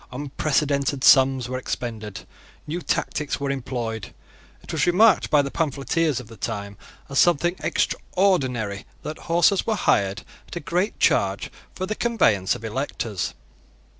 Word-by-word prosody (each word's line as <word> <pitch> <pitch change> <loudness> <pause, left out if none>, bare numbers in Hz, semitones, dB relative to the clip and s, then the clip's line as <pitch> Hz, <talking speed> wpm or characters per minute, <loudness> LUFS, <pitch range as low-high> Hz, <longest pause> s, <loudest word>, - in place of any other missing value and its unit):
Unprecedented 140 0 -1
sums 130 -2 +5
were 130 0 -3
expended. 110 -6 -5 0.4
New 170 +4 -4
tactics 150 -3 -2
were 140 -1 -1
employed. 120 -5 -4 0.5
It - - -8
was - - +1
remarked 205 +5 +5
by 145 -1 +4
the 140 - -4
pamphleteers 155 -1 0
of 125 - -9
that 115 -4 -14
time 100 0 -4 0.3
as 140 - 0
something 175 0 +4
extraordinary 125 - 0 0.2
that 155 - -6
horses 175 +3 +3
were 220 - +2
hired 100 - +1 0.2
at - - -9
a - - -2
great 180 +5 -1
charge - - +2 0.2
for 185 - -3
the 210 - -2
conveyance 125 - +2
of 115 -2 -8
electors. 110 -4 -3
140 Hz, 140 wpm, -24 LUFS, 115-165 Hz, 0.5 s, sums